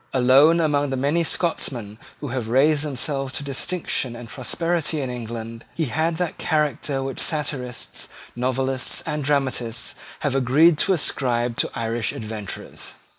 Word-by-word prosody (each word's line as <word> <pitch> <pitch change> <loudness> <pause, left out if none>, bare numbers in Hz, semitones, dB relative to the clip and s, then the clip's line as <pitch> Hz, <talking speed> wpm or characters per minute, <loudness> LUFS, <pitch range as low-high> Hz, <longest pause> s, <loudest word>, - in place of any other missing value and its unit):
Alone 135 +6 +6
among 145 -3 +2
the 135 - -1
many 145 +6 +2
Scotchmen 120 - -1 0.2
who 145 - -4
have 120 -3 -3
raised 145 +4 +4
themselves 135 -1 -2
to - - -4
distinction 140 -3 -1
and 120 -1 -9
prosperity 160 +6 -1
in 130 -3 -2
England, 115 -1 -6
he 165 - 0
had 160 +5 0
that 180 -2 -2
character 150 -3 0
which 135 0 -4
satirists, 135 -5 -2 0.3
novelists, 130 +1 0
and 150 -2 -2
dramatists 130 -4 0 0.3
have 145 - 0
agreed 145 +5 +5
to 195 - +4
ascribe 120 -7 +1
to - - +1
Irish 115 -1 -1
adventurers. 110 -3 -6
135 Hz, 140 wpm, -23 LUFS, 120-150 Hz, 0.3 s, Alone